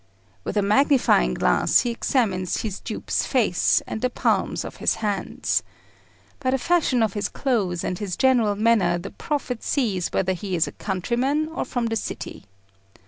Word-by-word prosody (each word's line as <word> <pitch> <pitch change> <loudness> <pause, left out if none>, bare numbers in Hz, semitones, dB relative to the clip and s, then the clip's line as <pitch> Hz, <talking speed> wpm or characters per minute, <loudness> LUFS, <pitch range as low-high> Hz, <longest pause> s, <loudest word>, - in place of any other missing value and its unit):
With - - -3
a 205 - +3
magnifying 210 - +3
glass 60 0 +3
he 240 - -1
examines 200 -7 0
his 210 -4 -4
dupe's - - -2
face 225 -10 +2
and 220 - -5
the 255 - +1
palms - - 0
of - - -8
his - - +1
hands. 205 -3 -1 0.8
By 265 -3 -1
the 265 - +2
fashion 285 -5 +2
of 215 -3 0
his 205 -1 -2
clothes 200 -10 -1
and 180 - -3
his 195 -4 -4
general 240 -6 +3
manner 205 -5 +3
the 170 - -7
prophet 270 -5 -3
sees 205 -11 0
whether 190 0 +1
he 185 0 -4
is 165 - +2
a - - -5
countryman 250 - -1
or 320 - -3
from 245 -2 -2
the 225 0 -1
city. 220 - -5
220 Hz, 170 wpm, -23 LUFS, 190-255 Hz, 0.8 s, a